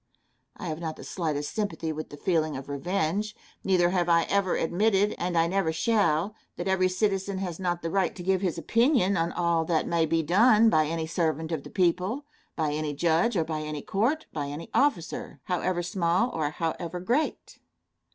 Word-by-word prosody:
I - - -7
have 160 -2 -3
not 160 -2 -4
the - - -11
slightest 150 -5 -3
sympathy 170 -7 -2
with 155 0 -6
the 145 - -10
feeling 155 -4 0
of 135 - -8
revenge. 180 +7 -1 0.3
Neither 175 -2 +3
have 175 -2 +1
I 170 0 +5
ever 200 -2 +2
admitted, 200 +4 +2
and 175 -1 -1
I 165 - +4
never 175 -1 +1
shall, 180 0 +1 0.2
that 175 - -4
every 185 -1 +2
citizen 195 0 0
has 180 -3 -4
not 175 -2 -2
the 165 - -2
right 195 -1 +1
to 180 - -7
give 190 0 +1
his 180 -4 -1
opinion 230 - +2
on 165 -1 0
all 170 -2 +1
that 160 -1 +1
may 165 -1 +2
be 165 +1 +1
done 215 +6 +5
by 155 -1 +3
any 165 0 -2
servant 160 -1 -1
of 160 -3 -2
the - - -11
people, 185 - 0 0.3
by 155 -2 0
any 150 -1 -2
judge, 170 +8 +2
or 165 - +2
by 155 -1 -3
any 150 -1 -5
court, 255 +11 0
by 145 -2 -3
any 145 +4 -7
officer 245 - 0
however 180 0 -1
small 180 +5 +1
or 155 -2 -1
however 165 +2 -3
great. 245 - -1
175 Hz, 190 wpm, -27 LUFS, 160-195 Hz, 0.3 s, I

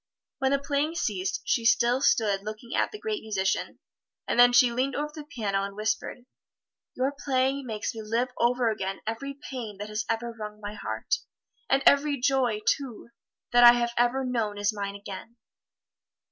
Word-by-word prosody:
When 265 - +2
the 280 - +3
playing 285 +3 -1
ceased, 195 - -1
she 235 - +1
still 245 +1 +3
stood 205 -7 +2
looking 215 +3 -7
at - - +1
the 420 - -7
great 430 -1 -3
musician, 190 -3 -1 0.5
and - - 0
then 245 0 +8
she 245 0 +5
leaned 255 +2 -1
over 300 +1 -2
the 305 -2 -8
piano 210 -9 -2
and 200 0 -5
whispered, 215 +3 -2 0.7
"Your 260 +2 0
playing 265 0 0
makes 215 -2 -3
me 225 - -6
live 230 +4 -1
over 240 0 +2
again 195 -2 -4
every 275 +6 -4 0.2
pain 230 -6 -6
that 205 +1 -6
has 215 +1 -2
ever 230 +1 -2
wrung 210 -1 -8
my 205 0 -6
heart; 350 - -2 0.5
and 270 0 +3
every 280 0 +4
joy, 250 -4 +1
too, 245 -2 -1 0.4
that 245 0 +6
I 240 0 +11
have 235 -1 0
ever 245 +2 +2
known 225 -5 -1
is 205 +1 +1
mine 200 -1 -4
again." 200 +3 -9
235 Hz, 175 wpm, -27 LUFS, 210-265 Hz, 0.7 s, I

